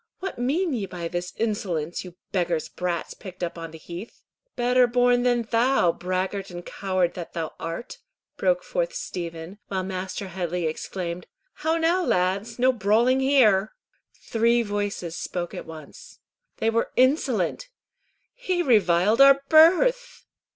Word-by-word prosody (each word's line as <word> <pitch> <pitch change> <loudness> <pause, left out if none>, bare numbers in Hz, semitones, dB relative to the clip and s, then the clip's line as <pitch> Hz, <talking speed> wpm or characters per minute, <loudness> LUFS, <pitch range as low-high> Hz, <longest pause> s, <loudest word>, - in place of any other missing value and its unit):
"What 380 -8 -5
mean 305 +7 0
ye 210 -6 -2
by 175 -2 -5
this 175 +1 -4
insolence, 185 -8 -2
you 180 -2 -11 0.2
beggars' 175 -4 -1
brats 175 -2 -3
picked 185 -2 -9
up 170 - -3
on 165 -1 -7
the 160 - -11
heath?" 175 +7 -10 0.3
"Better 250 +1 +3
born 245 0 +3
than 245 -1 +2
thou, 230 -4 +2
braggart 185 +3 -3
and 175 -1 -8
coward 185 -3 -1
that 175 -2 -8
thou 165 -2 -4
art!" 165 +9 -6 0.4
broke - - +1
forth - - -2
Stephen, 175 - -6
while 190 -1 -2
Master 190 +1 -5
Headley 175 -1 -3
exclaimed, 170 +2 -4 0.3
"How 320 +1 -1
now, 335 +3 +2
lads? 195 - 0
No 255 +1 +4
brawling 230 +4 +3
here!" 230 -7 +3 0.4
Three 235 +1 +2
voices 205 -5 -3
spoke 175 -2 -4
at - - -7
once. 160 - -12 0.4
"They 225 - +1
were 230 +1 0
insolent." 260 - +1 0.6
"He 370 -8 -1
reviled 210 - +3
our 275 0 +7
birth." 485 +11 +4
205 Hz, 145 wpm, -25 LUFS, 175-255 Hz, 0.6 s, our